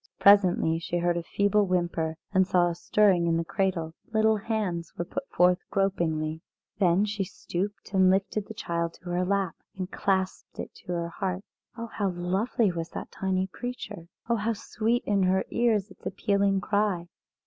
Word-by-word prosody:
Presently 185 -5 +5
she 170 +1 -2
heard 175 0 +1
a 170 - -1
feeble 205 +3 +2
whimper 170 -3 0 0.2
and 190 -1 +4
saw 175 -2 +3
a - - -2
stirring 180 0 +3
in 165 0 +2
the 165 - -1
cradle; 180 -4 -1 0.2
little 220 0 +3
hands 200 -6 -2
were 175 - -2
put 275 +9 -5
forth 180 +1 +4
gropingly. 160 -5 0 0.4
Then 185 +1 +4
she 205 -1 -2
stooped 195 +2 -5
and 190 -1 +5
lifted 195 +2 +1
the 220 - -8
child 170 -3 -2
to 175 0 -8
her 180 +1 +1
lap, 195 -2 0 0.2
and 185 0 -4
clasped 190 -1 -1
it - - -5
to 180 - -7
her 170 -1 -2
heart. 185 +1 -3 0.3
Oh, 230 - -4
how 205 -3 -2
lovely 190 +5 0
was 165 -1 -4
that - - -5
tiny 190 -1 0
creature! 205 -4 -7 0.2
Oh, 235 0 +2
how 220 +2 0
sweet 225 +2 -1
in 200 -1 +2
her 185 +1 +2
ears 220 -4 +1
its - - -17
appealing 200 0 +1
cry! 200 -3 +1
190 Hz, 175 wpm, -27 LUFS, 175-205 Hz, 0.4 s, Presently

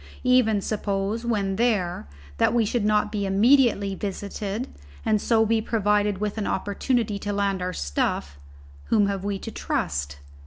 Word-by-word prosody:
Even 250 -5 +3
suppose, 205 +2 -2
when 200 -4 0
there, 205 - 0 0.3
that - - +3
we 230 -2 +3
should 230 +1 -1
not 210 0 +2
be 210 -2 -2
immediately 210 -1 +4
visited, 205 +3 -4 0.4
and 215 -1 +2
so 225 -1 +3
be 225 0 +2
provided 210 -2 +1
with 210 +2 -3
an 205 - -2
opportunity 205 +2 -1
to 205 - -3
land 200 -2 0
our 180 0 -2
stuff 70 - -2 0.5
whom 210 -2 +3
have 200 -1 -2
we 200 -1 -2
to 225 - -7
trust? 70 - -2
205 Hz, 155 wpm, -25 LUFS, 195-220 Hz, 0.5 s, immediately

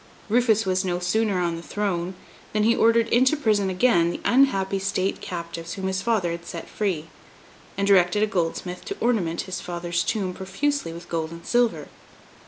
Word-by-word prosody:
Rufus 225 -2 +3
was 185 0 +1
no 180 -2 -1
sooner 195 +2 +1
on 170 -1 -1
the - - -7
throne, 185 -2 -2 0.4
than 210 0 +2
he 230 +2 +4
ordered 230 0 +4
into 260 +5 +4
prison 210 -8 +2
again 185 -3 +3
the - - -4
unhappy 200 -7 +3
state 195 0 -1
captives 170 -2 -6
whom 190 - -5
his 190 0 -1
father 205 -6 +1
had 170 0 -5
set 170 - -6
free, 185 -7 -2 0.7
and 200 - +1
directed 195 +1 +4
a - - +5
goldsmith 180 -2 -2
to 400 - -5
ornament 190 -9 +1
his 185 -1 -5
father's 175 0 -2
tomb 195 -4 -1
profusely 195 - -2
with 170 +1 -10
gold 160 -1 -2
and 170 0 -11
silver. 240 -1 +1
190 Hz, 180 wpm, -24 LUFS, 175-220 Hz, 0.7 s, a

